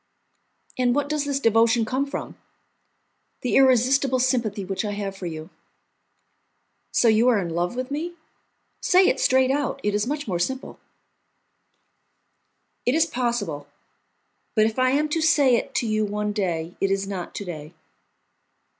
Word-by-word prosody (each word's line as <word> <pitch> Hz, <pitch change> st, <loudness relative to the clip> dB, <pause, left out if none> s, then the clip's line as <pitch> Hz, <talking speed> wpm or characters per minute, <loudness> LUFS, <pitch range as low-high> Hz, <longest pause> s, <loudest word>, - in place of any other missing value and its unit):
"And 245 Hz, -1 st, +2 dB
what 285 Hz, 0 st, 0 dB
does 300 Hz, -1 st, -1 dB
this 280 Hz, -1 st, -1 dB
devotion 230 Hz, -1 st, +3 dB
come 260 Hz, +5 st, -1 dB
from?" 275 Hz, -, -6 dB, 1.1 s
"The 250 Hz, -, -1 dB
irresistible 260 Hz, 0 st, +4 dB
sympathy 235 Hz, -6 st, 0 dB
which 195 Hz, +2 st, -3 dB
I 205 Hz, -1 st, -3 dB
have 200 Hz, -1 st, -4 dB
for 190 Hz, -2 st, -6 dB
you." 160 Hz, +1 st, -7 dB, 1.4 s
"So 240 Hz, -, +3 dB
you 225 Hz, +2 st, +4 dB
are 245 Hz, -3 st, +4 dB
in 175 Hz, -4 st, -2 dB
love 175 Hz, +6 st, -1 dB
with 255 Hz, +2 st, -4 dB
me? 335 Hz, +4 st, -4 dB, 0.7 s
Say 370 Hz, +1 st, +4 dB
it -, -, +1 dB
straight 260 Hz, 0 st, +3 dB
out, 285 Hz, -1 st, -1 dB
it 210 Hz, -, 0 dB
is 210 Hz, +2 st, 0 dB
much 290 Hz, 0 st, -3 dB
more 180 Hz, -4 st, -1 dB
simple." 260 Hz, +9 st, -3 dB, 2.0 s
"It 245 Hz, -, +1 dB
is 320 Hz, 0 st, +4 dB
possible; 235 Hz, -, -3 dB, 0.9 s
but 215 Hz, -1 st, +4 dB
if 225 Hz, +3 st, -2 dB
I 255 Hz, 0 st, +3 dB
am 290 Hz, +3 st, +1 dB
to 325 Hz, +2 st, -1 dB
say 295 Hz, -5 st, +4 dB
it -, -, -3 dB
to 235 Hz, -, 0 dB
you 215 Hz, 0 st, +1 dB
one 210 Hz, 0 st, -2 dB
day, 175 Hz, -4 st, -2 dB
it 195 Hz, -, +2 dB
is 195 Hz, 0 st, -1 dB
not 190 Hz, -3 st, -6 dB
to 205 Hz, -, -5 dB
day." 155 Hz, -4 st, -8 dB
235 Hz, 160 wpm, -24 LUFS, 200-270 Hz, 2.0 s, irresistible